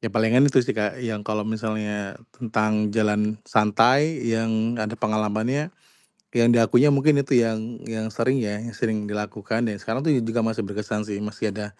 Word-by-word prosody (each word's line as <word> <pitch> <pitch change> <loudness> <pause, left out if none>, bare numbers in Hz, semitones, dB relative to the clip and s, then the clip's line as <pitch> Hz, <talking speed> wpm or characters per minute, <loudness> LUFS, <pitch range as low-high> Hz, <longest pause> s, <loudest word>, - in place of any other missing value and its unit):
Ya 115 - -3
palingan 120 +5 +3
itu 135 - +3
sih - - -1
Kak, 105 +2 -2
yang 105 -2 -3
kalau 105 -1 -1
misalnya 105 -2 -3 0.2
tentang 110 -3 0
jalan 105 0 +1 0.2
santai, 125 +9 +4 0.2
yang 115 0 0 0.3
gak 110 - 0
ada 115 - -6
pengalamannya, 110 +6 0 0.7
yang 115 0 +5
di - - +4
akunya 125 +6 +4
mungkin 145 +2 +4
itu 135 - -2
yang 110 -1 -1 0.4
yang 110 0 -3
sering 130 +3 +2
ya, 105 - -3
yang 115 -2 -8
sering 110 -2 0
dilakukan 105 +1 -3
ya, 105 - -4
sekarang 115 +4 -3
tuh 155 - +4 0.2
juga 115 +1 0
masih 115 0 -2
berkesan 105 +1 -3
sih, 100 - -3
masih 110 - -5
ada, 105 +1 -5
110 Hz, 185 wpm, -23 LUFS, 105-120 Hz, 0.7 s, yang